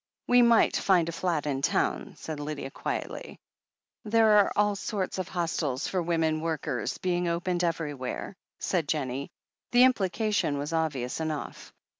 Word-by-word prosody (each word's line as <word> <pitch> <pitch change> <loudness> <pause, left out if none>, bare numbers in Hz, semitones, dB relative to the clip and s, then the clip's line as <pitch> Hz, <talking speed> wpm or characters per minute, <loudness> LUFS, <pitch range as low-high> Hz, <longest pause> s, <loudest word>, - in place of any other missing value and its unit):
"We 245 0 +6
might 235 -1 +5
find 180 -4 +3
a - - -2
flat 165 -3 -1
in 135 -2 -1
town," - - 0
said 155 -2 -6
Lydia 145 -2 -5
quietly. - - -5 0.6
"There 220 0 +4
are 200 - +3
all 205 0 +2
sorts 195 -2 -3
of 185 - -2
hostels 160 -6 -1
for 185 - -1
women 165 -2 0
workers 150 -7 -2
being 175 -1 0
opened 175 +1 -1
everywhere," 150 -1 -3 0.2
said 170 -6 -1
Jennie. 140 -3 -2 0.4
The 245 +1 +7
implication 210 - +2
was 145 +3 -4
obvious 150 -6 -1
enough. 155 -2 -4
165 Hz, 145 wpm, -28 LUFS, 150-190 Hz, 0.6 s, The